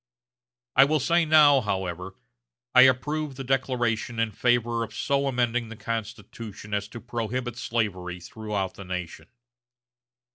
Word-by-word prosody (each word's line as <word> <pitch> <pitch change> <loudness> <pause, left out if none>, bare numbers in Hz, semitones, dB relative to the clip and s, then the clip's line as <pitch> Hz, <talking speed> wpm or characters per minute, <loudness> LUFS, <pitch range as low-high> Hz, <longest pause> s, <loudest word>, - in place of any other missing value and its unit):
I - - +8
will 155 +2 +1
say 170 +5 +2
now, 150 -3 +6
however, 95 -3 -3 0.6
I 125 - +8
approve 145 +2 -2
the 135 - -6
declaration 125 -3 -1
in 115 -1 0
favor 120 +1 +1
of 115 - -8
so 140 0 0
amending 120 -3 0
the 115 - -8
Constitution 110 -1 -6
as 100 0 -1
to 120 - -9
prohibit 120 +1 -3
slavery 95 -7 -2
throughout 105 -1 -4
the 100 - -10
nation. 90 -2 -6
115 Hz, 135 wpm, -26 LUFS, 105-130 Hz, 0.6 s, I